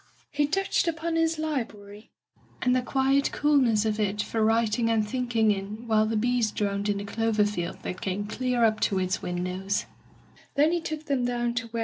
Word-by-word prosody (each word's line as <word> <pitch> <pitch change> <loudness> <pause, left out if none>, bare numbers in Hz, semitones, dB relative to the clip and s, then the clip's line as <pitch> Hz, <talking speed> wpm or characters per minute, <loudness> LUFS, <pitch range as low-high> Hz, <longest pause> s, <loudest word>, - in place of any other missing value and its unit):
He 290 0 +1
touched 390 +3 0
upon 330 0 -1
his 325 0 +1
library, 220 -9 -5 0.5
and 250 0 +3
the 255 - +2
quiet 270 +2 +1
coolness 255 -8 +3
of 215 0 -1
it 210 0 0
for 220 +1 0
writing 225 +1 +2
and 220 -2 +1
thinking 235 -3 +1
in 205 +4 -5
while 215 -1 +3
the 220 0 0
bees 240 0 +1
droned 200 0 -1
in 205 - +1
the 200 - -4
clover 220 0 +1
field 175 -4 -3
that 180 - -5
came 195 +2 -2
clear 250 +2 0
up 220 -1 +2
to 195 - +1
its 185 +1 -1
windows. 180 +3 -2
220 Hz, 155 wpm, -27 LUFS, 205-255 Hz, 0.5 s, and